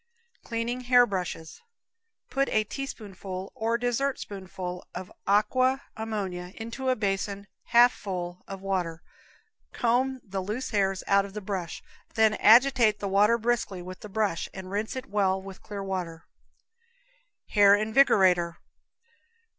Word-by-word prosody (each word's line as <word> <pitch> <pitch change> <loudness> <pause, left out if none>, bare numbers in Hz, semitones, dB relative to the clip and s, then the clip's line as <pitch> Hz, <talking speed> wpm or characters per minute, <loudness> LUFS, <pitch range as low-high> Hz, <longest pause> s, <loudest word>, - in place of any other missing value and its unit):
Cleaning 235 +1 -3
Hair 245 -1 +7
Brushes. 180 -6 -5 0.7
Put 275 0 +1
a 215 - +2
teaspoonful 200 -7 -7
or 225 +1 0
dessertspoonful 200 -8 -3
of 185 - -7 0.2
aqua 255 +6 +2
ammonia 195 -5 -4
into 230 +4 -4
a 255 - +3
basin 200 -1 -2 0.2
half 240 +1 +6
full 180 -2 -5
of 195 -1 -7
water, 175 -4 -2 0.7
comb 255 +2 +1
the 195 -2 -4
loose 215 +8 -4
hairs 195 -3 +1
out 200 0 +4
of 200 - -10
the - - -2
brush, 190 -4 -5 0.3
then 220 -1 +4
agitate 235 0 +5
the 205 - -4
water 205 +4 +4
briskly 225 -6 -1
with 185 +1 -9
the 210 - -10
brush, 200 -4 -1
and 190 -1 -8
rinse 210 +4 -2
it 260 0 -5
well 195 -5 +1
with 190 0 -10
clear 205 -2 -6
water. 180 -4 -4 1.2
Hair 200 -1 +6
Invigorator. 190 -6 +3
205 Hz, 130 wpm, -27 LUFS, 190-230 Hz, 1.2 s, Hair